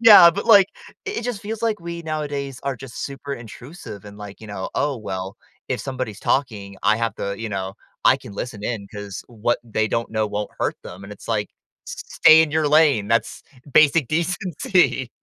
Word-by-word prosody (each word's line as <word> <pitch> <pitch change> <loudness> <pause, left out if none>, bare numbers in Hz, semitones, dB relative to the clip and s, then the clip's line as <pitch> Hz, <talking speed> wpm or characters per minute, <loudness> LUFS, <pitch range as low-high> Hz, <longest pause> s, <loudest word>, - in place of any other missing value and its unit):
Yeah, 205 -7 +10
but 200 +6 -4
like, 200 -4 +8 0.4
it 410 0 -3
it - - -4
just 240 -5 -3
feels 220 +2 -5
like 225 -2 +1
we 170 0 -6
nowadays 145 -4 -4
are 140 -1 -2
just 130 -1 -7
super 140 0 -6
intrusive 115 - -10
and 105 0 -11
like, 105 -1 -9
you 110 - -10
know, 100 -2 -5
"Oh 145 -2 0
well, 95 -3 -5 0.3
if - - -1
somebody's 130 -6 -5
talking, 105 -8 -1
I 110 - +4
have 115 -2 -1
the 100 0 -3
you 115 - -4
know, 95 -2 -4 0.3
I - - +6
can 105 - -11
listen 105 0 -6
in 110 -4 -3
'cause 105 -2 -7
what 120 0 0
they 110 -1 0
don't 115 +1 -1
know 110 -1 0
won't 105 0 -3
hurt - - 0
them" 90 +3 -10
and 100 - -9
it's 105 - -13
like, 105 -3 0 0.4
s - - -4
s - - -13
stay 160 0 +9
in 160 - -1
your 155 -1 +1
lane, 145 -9 +4
that's 115 +1 0 0.3
basic 150 -2 +5
decency. 170 - +1
125 Hz, 205 wpm, -22 LUFS, 105-160 Hz, 0.4 s, Yeah